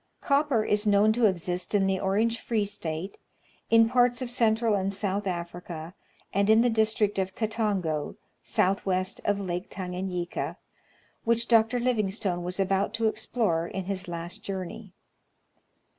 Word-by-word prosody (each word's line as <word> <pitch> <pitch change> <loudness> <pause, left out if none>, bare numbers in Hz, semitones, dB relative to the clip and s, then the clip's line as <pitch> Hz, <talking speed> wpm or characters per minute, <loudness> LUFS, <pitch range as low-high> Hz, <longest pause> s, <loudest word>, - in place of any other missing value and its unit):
Copper 280 -6 +2
is 210 +1 +1
known 205 +1 +5
to 230 -1 +4
exist 180 0 -2
in 195 -1 +3
the 190 -1 +1
Orange 220 +5 +1
Free 220 -3 0
State, 180 -2 -5 0.5
in 225 0 +6
parts 245 0 +3
of 255 -2 -4
Central 225 -2 +2
and 195 -1 0
South 200 0 -2
Africa, 170 -1 -5 0.4
and 200 +1 +2
in 220 +1 +7
the 245 0 +3
district 220 -2 +1
of 190 0 -2
Katongo, 205 -9 -1 0.3
south 195 +2 +1
west 185 -1 -1
of 205 -1 +1
Lake 180 -2 -3
Tanganyika, 180 -2 -4 0.7
which 235 0 +1
Dr. 230 +1 +4
Livingstone 205 -6 0
was 180 +2 -3
about 195 +2 +1
to 225 -1 +1
explore 215 -6 0
in 190 +2 -4
his 195 0 -3
last 170 0 -5
journey. 190 -3 -6
200 Hz, 145 wpm, -27 LUFS, 185-225 Hz, 0.7 s, in